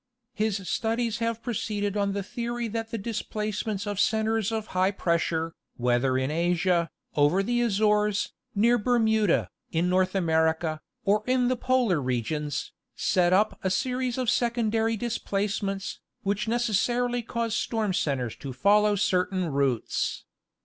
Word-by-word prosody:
His 210 -3 -1
studies 230 +3 -1
have 230 -1 -2
proceeded 210 -3 -2
on 200 -1 0
the 200 0 -2
theory 240 +2 -3
that 225 +1 -3
the 230 - -3
displacements 215 -1 -3
of 205 -1 -3
centres 220 0 +1
of 220 -1 -2
high 185 +1 +3
pressure, 165 -3 0 0.2
whether 125 +2 +2
in 130 +2 0
Asia, 170 +1 +1 0.3
over 150 +7 +3
the 240 +3 +1
Azores, 210 -2 +2 0.2
near 235 +4 +4
Ber 245 +3 +2
muda, 220 -4 +2 0.2
in 170 +2 +1
North 185 +1 +2
America, 160 -2 +1 0.2
or 210 +2 +3
in 250 -1 +2
the 255 - +2
Polar 245 - +1
regions, 130 +4 -2 0.2
set 180 -1 +2
up 210 +4 +2
a 190 - +1
series 250 +5 -1
of 255 -1 -1
secondary 225 -2 +1
displacements, 200 -3 -2 0.2
which 200 +3 -1
necessarily 240 +2 +1
cause 230 -1 -2
storm 220 -5 0
cen 145 -6 0
tres 125 -3 -4
to 135 -2 -6
follow 205 +9 +4
certain 185 -2 +1
routes. 135 -5 -1
205 Hz, 140 wpm, -27 LUFS, 175-230 Hz, 0.3 s, near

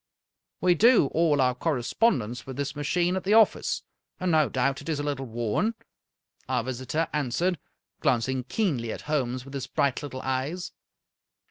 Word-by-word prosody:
" - - -58
We 180 -1 +5
do 220 - +5
all 160 -3 +3
our 125 -1 +3
correspondence 125 - 0
with 130 - -7
this 140 0 -3
machine 175 +5 0
at 190 - -2
the 205 +3 +3
office, 225 -1 +3 0.4
and 185 -1 0
no 155 -3 +4
doubt 135 +1 0
it - - -8
is 155 -3 -1
a - - -2
little 140 -2 -3
worn," 120 - -1 0.7
our 125 -3 +1
visitor 130 +6 -2
an 145 -4 0
swered, 180 +8 0 0.4
glancing 130 +2 +1
keenly 140 - -1
at - - -6
Holmes 130 -4 -2
with 135 - -11
his 135 -2 -4
bright 140 -3 0
little 130 -3 -6
eyes. 135 +8 -2
140 Hz, 170 wpm, -27 LUFS, 130-170 Hz, 0.7 s, We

